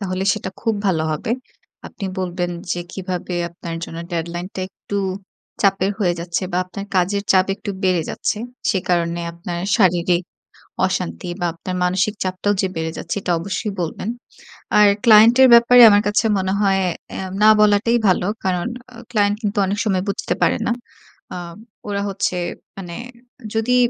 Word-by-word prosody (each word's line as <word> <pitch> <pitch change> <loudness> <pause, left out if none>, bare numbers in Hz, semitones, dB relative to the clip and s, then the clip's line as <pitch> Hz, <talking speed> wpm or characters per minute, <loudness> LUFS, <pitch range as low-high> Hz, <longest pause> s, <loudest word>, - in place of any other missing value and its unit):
তাহলে 185 -1 -2
সেটা 210 -3 -4
খুব 225 -1 0
ভালো 165 -4 +1
হবে। 155 - -4 0.6
আপনি 205 - -8
বলবেন 180 -1 -2 0.2
যে 175 - -2
কিভাবে 185 -1 -4
আপনার 170 0 -7
জন্য 165 - -8
ডেডলাইনটা 175 +3 -4
একটু 205 - -7 0.7
চাপের 195 -1 +2
হয়ে 180 -4 +2
যাচ্ছে 170 +2 -2
বা - - 0
আপনার 195 +2 -7
কাজের 195 +3 +1
চাপ 185 -1 +4
একটু 205 +1 -6
বেড়ে 180 -3 +2
যাচ্ছে। - - -2 0.3
সে 195 - +1
কারণে 170 -1 +1
আপনার 170 +1 -6 0.2
শারীরিক 175 -3 +3 0.6
অশান্তি 85 - -3
বা 175 - -1
আপনার 180 +2 -6
মানসিক 185 +3 +1
চাপটাও 185 +2 0
যে 190 - +1
বেড়ে 160 0 -2
যাচ্ছে 165 - -4
এটা 180 - -2
অবশ্যই 200 +5 -3
বলবেন। 175 +5 -4 0.7
আর 210 - +8 0.2
ক্লায়েন্টের 235 +3 +7
ব্যাপারে 240 +1 +7
আমার 205 0 +5
কাছে 210 +2 +1
মনে 190 0 -1
হয় 195 -2 +3 0.3
অ্যা 190 - -4 0.2
না 215 - +7
বলাটাই 210 +3 +4
ভালো। 180 -1 +2 0.2
কারণ 180 -1 0 0.3
আ - - -13
ক্লায়েন্ট 205 -2 +2
কিন্তু 205 0 -1
অনেক 200 +2 -2
সময় 190 -4 +1
বুঝতে 200 - -1
পারে - - +3
না। - - +2 0.6
আ - - -5 0.5
ওরা 200 -1 -1
হচ্ছে 195 -2 -1 0.4
মানে 175 -3 -7 0.6
যদি 235 +3 +2
190 Hz, 160 wpm, -20 LUFS, 175-205 Hz, 0.7 s, আর